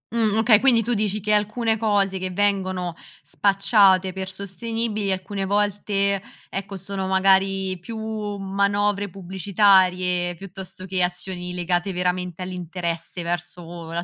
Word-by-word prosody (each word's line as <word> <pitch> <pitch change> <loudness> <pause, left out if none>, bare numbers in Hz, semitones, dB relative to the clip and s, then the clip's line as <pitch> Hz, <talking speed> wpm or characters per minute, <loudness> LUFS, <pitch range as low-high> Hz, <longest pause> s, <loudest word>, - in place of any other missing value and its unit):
Mh, 220 -3 +2
okay, 220 -1 +6
quindi 240 -3 +4
tu 240 +3 0
dici 210 -1 0
che 210 +2 +1
alcune 220 +2 +1
cose 200 -3 +1
che 185 0 -3
vengono 185 -2 0 0.3
spacciate 195 -2 +3
per 190 0 -5
sostenibili 210 +2 -3
alcune 195 +1 -3
volte, 200 0 0 0.3
ecco 195 0 -5
sono 190 0 -4
magari 190 0 +2
più 220 +6 -8 0.4
manovre 200 +1 0
pubblicitarie, 185 -1 +2
piuttosto 190 0 -9
che 185 -1 -1
azioni 180 0 -3
legate 175 +1 0
veramente 180 0 -2
all'interesse 175 -1 -4
verso 170 -1 -5
la 170 +1 -2
190 Hz, 125 wpm, -23 LUFS, 180-205 Hz, 0.4 s, okay